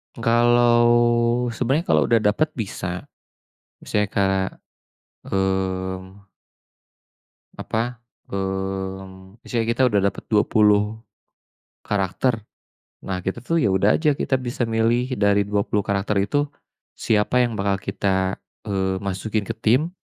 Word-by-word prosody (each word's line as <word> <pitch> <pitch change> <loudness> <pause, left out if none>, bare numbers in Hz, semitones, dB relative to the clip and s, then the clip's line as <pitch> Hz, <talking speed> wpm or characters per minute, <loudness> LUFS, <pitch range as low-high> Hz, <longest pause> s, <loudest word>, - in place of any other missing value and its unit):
Kalau, 120 +1 +4 0.6
sebenarnya 130 +8 0
kalau - - +4
udah 115 - +4
dapet 140 +10 +2
bisa, 90 -5 -4 0.8
misalnya 105 -1 -1
kak 95 -1 +1 0.8
mmm 95 0 -2 1.3
apa, 120 +1 -3 0.3
mmm, 95 0 -5
misalnya 115 -2 -1
kita 120 +3 -1
udah 105 -4 +2
dapet - - -11
20 105 0 +3 0.9
karakter, 105 +3 0 0.6
nah 95 -1 -3
kita 95 +5 -4
tuh 165 +5 +1
ya 105 - +2
udah 95 +2 +3
aja, 150 -3 +2
kita - - -2
bisa 120 -1 -2
milih 115 +3 +1
dari 100 -1 +3
20 105 0 -1
karakter 100 +1 0
itu, 145 +5 0 0.5
siapa 110 +3 +2
yang 120 -1 -1
bakal 100 -1 0
kita, 95 -1 -1 0.3
eee, 95 -2 -1
masukin 100 +2 -3
ke - - -3
tim 130 +10 +1
105 Hz, 115 wpm, -22 LUFS, 95-120 Hz, 1.3 s, Kalau